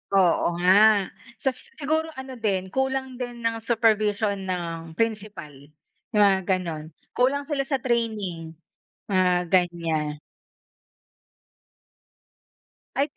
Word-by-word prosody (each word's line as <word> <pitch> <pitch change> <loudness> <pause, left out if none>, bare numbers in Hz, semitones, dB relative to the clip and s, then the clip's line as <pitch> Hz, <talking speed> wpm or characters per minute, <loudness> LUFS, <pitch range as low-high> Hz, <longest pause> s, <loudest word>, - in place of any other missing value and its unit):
Oo 175 -2 +3
nga. 200 +3 +5 0.3
Sa 265 - 0
siguro 310 +5 -3
ano 265 -1 -8
din, 190 -4 -1
kulang 265 0 -1
din 245 -1 -6
ng 230 0 0
supervision 215 -2 +1
ng 165 -3 -4
principal, 215 -7 -2 0.6
'yong 210 - +6
mga 195 -1 +4
gano'n. 170 -5 -1 0.3
Kulang 270 +3 +1
sila 280 -2 -2
sa 285 - +1
training, 210 -9 -2 0.5
mga 180 -3 +2
ganyan. 165 -5 0 2.8
Ay 280 +1 +2
210 Hz, 100 wpm, -25 LUFS, 180-245 Hz, 2.8 s, yong